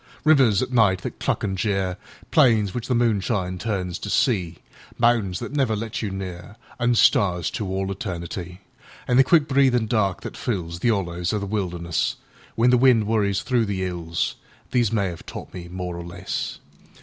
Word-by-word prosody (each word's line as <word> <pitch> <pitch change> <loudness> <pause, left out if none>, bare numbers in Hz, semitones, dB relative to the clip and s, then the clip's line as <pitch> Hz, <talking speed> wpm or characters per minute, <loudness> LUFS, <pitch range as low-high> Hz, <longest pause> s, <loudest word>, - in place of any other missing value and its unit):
Rivers 135 -10 +5
at 130 - -5
night 100 -6 +4
that - - -6
cluck - - -1
an' 95 -2 -1
jeer, 95 -2 -1 0.4
Plains 115 - +4
which 120 -1 -4
the 125 - +1
moonshine 100 -5 0
turns 95 -5 -3
to 105 - -6
sea, 100 - +1 0.4
Mountains 115 -7 +2
that - - -6
never 135 -6 +1
let 110 +1 -4
you 105 - -2
near, 95 0 -7 0.2
An' 120 0 +2
stars 90 - +3
to 100 +6 -3
all 95 +1 -2
eternity; 90 -1 -6 0.5
An' 125 - +3
the 135 - +8
quick 155 +2 +4
breathin' 130 -4 +3
dark 105 -4 0
that - - -6
fillsThe 90 -1 -1
'ollows 90 -3 -1
of 105 - -1
the - - -3
wilderness, 90 -5 -2 0.4
When 120 +2 +4
the 125 - +4
wind 125 -4 +5
worries 100 -3 +1
through 120 -3 +1
the 95 -2 -2
'ills—These 90 +6 -2
may 100 -5 0
'ave 85 - -9
taught - - -8
me 90 -1 -7
more 90 -1 -5
or 85 - -6
less. 85 +1 -4
100 Hz, 175 wpm, -23 LUFS, 90-115 Hz, 0.5 s, the